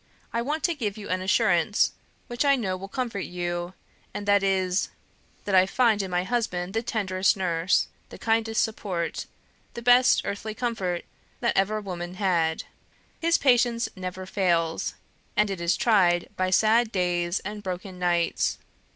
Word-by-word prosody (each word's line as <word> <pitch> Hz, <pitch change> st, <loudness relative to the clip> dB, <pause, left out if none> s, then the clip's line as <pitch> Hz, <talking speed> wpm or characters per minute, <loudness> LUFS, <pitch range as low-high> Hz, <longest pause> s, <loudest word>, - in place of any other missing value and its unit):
I 235 Hz, -, 0 dB
want 300 Hz, +6 st, -2 dB
to 345 Hz, -, +2 dB
give 220 Hz, -9 st, -3 dB
you 210 Hz, -, -8 dB
an 185 Hz, 0 st, 0 dB
assurance, 190 Hz, +3 st, +2 dB, 0.3 s
which 240 Hz, +2 st, -2 dB
I 280 Hz, -1 st, +5 dB
know 195 Hz, -8 st, -2 dB
will 190 Hz, +1 st, -7 dB
comfort 230 Hz, -1 st, -3 dB
you 175 Hz, 0 st, -4 dB, 0.4 s
and 205 Hz, 0 st, -5 dB
that 200 Hz, 0 st, +5 dB
is, 190 Hz, -1 st, +1 dB, 0.6 s
that 200 Hz, -, -2 dB
I 185 Hz, 0 st, +6 dB
find 225 Hz, -1 st, +3 dB
in 190 Hz, -, -4 dB
my 180 Hz, 0 st, 0 dB
husband 185 Hz, -5 st, -2 dB
the 225 Hz, -, 0 dB
tenderest 195 Hz, -5 st, +1 dB
nurse, 175 Hz, -1 st, +1 dB, 0.2 s
the -, -, -10 dB
kindest 225 Hz, 0 st, +1 dB
support, 190 Hz, -6 st, -3 dB, 0.5 s
the 235 Hz, -, -6 dB
best 245 Hz, +1 st, +5 dB
earthly 210 Hz, +2 st, -4 dB
comfort 210 Hz, -8 st, -2 dB, 0.4 s
that 235 Hz, -, +1 dB
ever 210 Hz, +3 st, +1 dB
woman 180 Hz, -3 st, -6 dB
had. 170 Hz, -5 st, +1 dB, 0.6 s
His 335 Hz, +1 st, +3 dB
patience 240 Hz, -3 st, +3 dB
never 185 Hz, 0 st, -6 dB
fails, 170 Hz, -4 st, 0 dB, 0.4 s
and 210 Hz, -1 st, +3 dB
it 190 Hz, -3 st, -4 dB
is 170 Hz, +1 st, +1 dB
tried 180 Hz, -6 st, +3 dB
by 185 Hz, 0 st, 0 dB
sad 220 Hz, +4 st, +3 dB
days 175 Hz, -2 st, 0 dB
and 210 Hz, +2 st, -6 dB
broken 185 Hz, -1 st, -6 dB
nights. 175 Hz, -1 st, +1 dB
195 Hz, 160 wpm, -26 LUFS, 180-225 Hz, 0.6 s, I